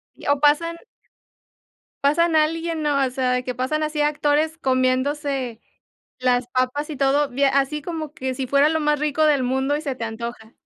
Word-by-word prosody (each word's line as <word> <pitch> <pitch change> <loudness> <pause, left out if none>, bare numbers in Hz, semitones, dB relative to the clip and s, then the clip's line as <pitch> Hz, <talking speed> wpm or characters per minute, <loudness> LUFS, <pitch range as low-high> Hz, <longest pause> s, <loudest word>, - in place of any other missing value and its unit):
Y - - -10
o 285 0 +2
pasan 300 +3 +2 1.3
pasan 325 +3 +3
a 310 - +6
alguien, 325 +1 -2
¿no? 290 -2 +1
O - - -4
sea, 255 0 0
de 250 0 -1
que 250 - -3
pasan 260 +5 -1
así 305 -1 -1
actores 300 +1 +1
comiéndose 260 -2 0 0.6
las 250 -1 +1
papas 255 +4 -1
y 300 - -5
todo, 280 +2 +2
bie 275 +2 +1
así 275 +2 +1
como 315 -1 -5
que 260 -3 -4
si 260 0 -4
fuera 280 +2 +4
lo 320 0 0
más 300 -1 +1
rico 300 +1 +1
del 290 -4 +3
mundo 265 +3 0
y 300 - -5
se 280 -4 -3
te 250 - -10
antoja. 225 0 -6
285 Hz, 190 wpm, -22 LUFS, 255-300 Hz, 1.3 s, a